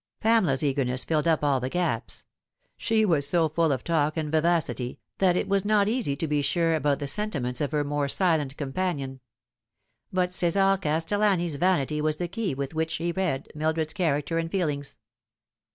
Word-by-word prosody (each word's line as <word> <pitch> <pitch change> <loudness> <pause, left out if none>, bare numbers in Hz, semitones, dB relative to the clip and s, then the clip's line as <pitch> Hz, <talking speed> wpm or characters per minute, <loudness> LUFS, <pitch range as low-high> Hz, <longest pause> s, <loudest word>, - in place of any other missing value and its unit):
Pamela's 205 - +3
eagerness 130 -3 0
filled 155 0 0
up 160 -2 +2
all 140 -2 +2
the 130 +1 -3
gaps; 115 - -2 0.5
she 220 -1 +1
was 150 -7 +2
so 165 +2 +3
full 160 0 +1
of 135 - -2
talk 155 -2 0
and 155 -2 -2
vivacity 160 -6 0 0.2
that 185 -2 +3
it - - -1
was 195 -1 +1
not 205 -1 +3
easy 220 - 0
to 160 +3 -2
be 150 -1 +1
sure 165 +3 +1
about 145 -2 +1
the 145 - -4
sentiments 145 -8 -1
of 145 - -1
her 150 -1 +1
more 145 0 -1
silent 150 -4 +1
companion; 140 -3 -3 0.9
but 180 -1 0
Ce"sar 195 +2 +3
Castellani's 175 0 +1
vanity 150 -3 +1
was 155 0 +1
the 175 - -2
key 195 -4 -3
with 140 +1 -4
which 160 0 -1
he 170 +1 -1
read 170 -7 -2
Mildred's 155 +1 -1
character 165 -3 0
and 165 0 -2
feelings. 150 -7 -2
160 Hz, 175 wpm, -26 LUFS, 145-180 Hz, 0.9 s, Pamela's